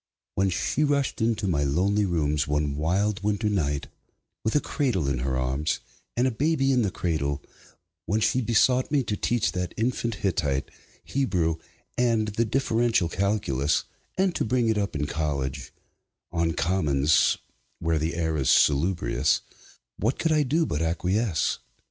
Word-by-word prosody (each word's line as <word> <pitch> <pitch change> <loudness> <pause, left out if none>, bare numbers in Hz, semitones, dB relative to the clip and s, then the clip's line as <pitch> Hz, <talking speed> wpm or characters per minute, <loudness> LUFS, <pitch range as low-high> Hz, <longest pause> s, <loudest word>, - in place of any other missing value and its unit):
When 95 0 +1
she 95 - 0
rushed 140 -4 0
into 110 -2 +1
my 75 -6 +1
lonely 95 +9 +2
rooms, 75 -4 0
one 75 -1 0
wild 95 +7 0
winter 105 +1 0
night, 75 -8 0 0.6
with 110 - 0
a - - +6
cradle 125 - -1
in 70 -3 0
her 65 +1 -1
arms 65 +4 -1 0.4
and 125 - +3
a - - +1
baby 135 +2 +1
in 125 -2 +3
the 105 - +1
cradle; 75 -6 -2 0.6
when 105 +5 +1
she 115 +4 +2
besought 125 +2 +3
me 140 -2 +2
to 105 - -2
teach 115 +1 0
that 90 -1 -4
infant 115 0 -1
Hittite, 75 -9 -1 0.3
Hebrew, 90 - 0 0.4
and 115 -3 +2
the 110 +3 0
Differential 115 -5 +1
Calculus, 90 -8 0 0.3
and 190 -1 +2
to - - -1
bring 120 0 +1
it 110 - +1
up 100 -5 -2
in 75 0 -1
college, 70 -4 -3 0.6
on 85 -1 0
commons 75 -5 +2 0.4
(where 80 -1 0
the 80 +2 -2
air 80 -2 -1
is 65 - +1
salubrious), 85 +5 +3 0.6
what 115 +7 0
could 165 - 0
I 155 -1 +4
do 155 +4 +1
but 75 - -2
acquiesce? 90 +3 0
95 Hz, 155 wpm, -26 LUFS, 75-115 Hz, 0.6 s, a